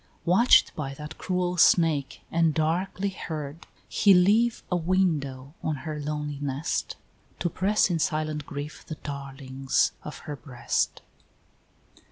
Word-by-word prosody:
Watch'd 190 +9 +5
by 135 -3 -4
that 150 +2 -9
cruel 180 -1 -1
Snake 160 -5 +3
and 165 -2 +2
darkly 180 +5 0
heard, 155 -4 -6 0.2
He 200 -2 +5
leave 215 +6 +3
a - - +3
widow 155 -7 0
on 155 - -1
her 155 -1 -4
lonely 150 -1 -3
nest, 145 +3 -2 0.4
To 175 - -1
press 195 +2 +2
in 170 - 0
silent 155 -1 -1
grief 145 0 -6
the 155 - -7
darlings 135 -2 -1
of 150 - -7
her 150 -3 -4
breast. 120 -2 -2
155 Hz, 130 wpm, -27 LUFS, 145-180 Hz, 0.4 s, Watch'd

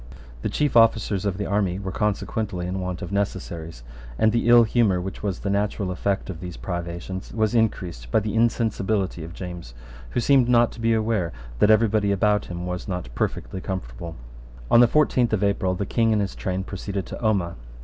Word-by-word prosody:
The - - -1
chief 145 -4 0
officers 110 -4 +4
of 95 -3 -1
the 100 - -2
army 100 -3 0
were 95 -1 -4
consequently 105 -2 -2
in 95 +2 -3
want 90 -1 -4
of 90 - -6
necessaries; 85 -8 -3 0.3
and 110 - +4
the 115 +1 0
ill 120 0 +8
humour 110 -5 +2
which 95 +2 -6
was 100 -3 -2
the 100 - -2
natural 100 -1 -1
effect 100 +2 -1
of 90 -5 -6
these 90 -1 -7
privations 85 +1 -5
was 110 0 0
increased 90 - -1
by 65 - +3
the 105 0 -3
insensibility 110 -5 0
of 85 +1 -9
James, 90 -9 -8 0.3
who - - -1
seemed 130 0 +4
not 120 -1 +4
to 115 - -10
be 115 0 +3
aware 110 -6 0 0.3
that 105 - +5
every 110 +1 +5
body 105 -1 +1
about 105 +1 +2
him 90 0 -6
was 90 0 -4
not 90 -11 -4
perfectly 95 - -3
comfortable, 85 -3 -5 0.6
On - - +7
the 120 - +8
fourteenth 125 -4 +2
of 105 -2 +1
April 95 -2 +1
the 100 - -2
King 115 +2 +2
and 105 - +2
his 95 - -4
train 95 0 -3
proceeded 100 0 -4
to - - -8
Omagh. 95 -6 +1
100 Hz, 200 wpm, -24 LUFS, 90-110 Hz, 0.6 s, ill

